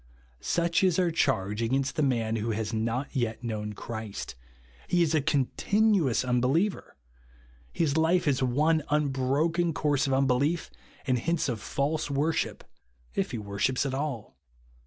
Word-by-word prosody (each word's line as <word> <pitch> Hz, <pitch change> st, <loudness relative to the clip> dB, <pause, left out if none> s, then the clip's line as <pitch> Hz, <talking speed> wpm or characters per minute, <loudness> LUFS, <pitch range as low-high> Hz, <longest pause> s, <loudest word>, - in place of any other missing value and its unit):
Such 170 Hz, +1 st, +1 dB
is 185 Hz, -3 st, +3 dB
our 180 Hz, -2 st, +2 dB
charge 110 Hz, -, 0 dB
against 135 Hz, +4 st, 0 dB
the 155 Hz, -, 0 dB
man 115 Hz, -5 st, +1 dB
vfho 110 Hz, 0 st, -1 dB
has 110 Hz, 0 st, -3 dB
not 115 Hz, +6 st, -2 dB
yet 120 Hz, -2 st, -1 dB
known 105 Hz, -2 st, -3 dB
Christ. 110 Hz, -1 st, -6 dB, 0.5 s
He 175 Hz, -1 st, +3 dB
is 165 Hz, -1 st, 0 dB
a 155 Hz, -, +3 dB
continuous 155 Hz, -, +2 dB
unbeliever. 130 Hz, +11 st, 0 dB, 0.8 s
His 160 Hz, -4 st, 0 dB
liie 160 Hz, +3 st, +2 dB
is 135 Hz, -3 st, +1 dB
one 150 Hz, +6 st, +2 dB
unbroken 150 Hz, +4 st, +1 dB
course 145 Hz, -1 st, +1 dB
of 135 Hz, -, 0 dB
unbelief, 135 Hz, +5 st, +1 dB, 0.3 s
and 130 Hz, -3 st, +1 dB
hence 165 Hz, +5 st, 0 dB
of 115 Hz, -5 st, -3 dB
false 150 Hz, +6 st, -1 dB
worship, 145 Hz, +3 st, -1 dB, 0.5 s
if -, -, -1 dB
he 120 Hz, -, -4 dB
Avorships 105 Hz, +6 st, -1 dB
at 135 Hz, -, -2 dB
all. 130 Hz, -, -4 dB
135 Hz, 145 wpm, -28 LUFS, 115-160 Hz, 0.8 s, is